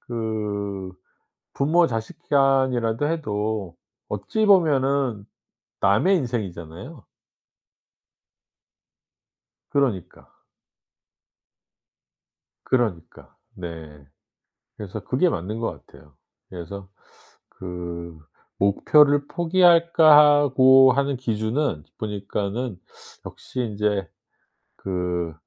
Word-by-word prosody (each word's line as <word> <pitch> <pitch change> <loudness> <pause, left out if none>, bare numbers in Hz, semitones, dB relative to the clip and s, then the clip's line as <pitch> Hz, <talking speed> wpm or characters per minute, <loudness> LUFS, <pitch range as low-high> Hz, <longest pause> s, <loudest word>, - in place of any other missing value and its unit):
그 105 -4 -4 0.6
부모 165 +5 +2
자식 115 -4 -5
간이라도 130 -3 +2
해도 105 - -3 0.3
어찌 210 - -2
보면은 140 - +2 0.5
남의 110 - +3
인생이잖아요. 105 - -6 2.6
그러니까. 125 - -2 2.3
그러니까. 110 -10 -3 0.2
네. 80 -5 -10 0.7
그래서 100 -3 -7
그게 140 +8 +1
맞는 105 - -4
것 115 - -5
같아요. 75 -2 -19 0.4
그래서 95 +2 -9 0.6
그 85 -2 -8 0.4
'목표를 145 +8 +3
포기할까.' 165 -4 +5
하고 130 -1 +6
하는 140 +1 0
기준은 110 - -2
보니까는 105 +1 -4 0.5
역시 130 - -7
인제 105 -5 -2 0.7
그 90 -3 -3
110 Hz, 165 characters per minute, -23 LUFS, 95-140 Hz, 2.6 s, 하고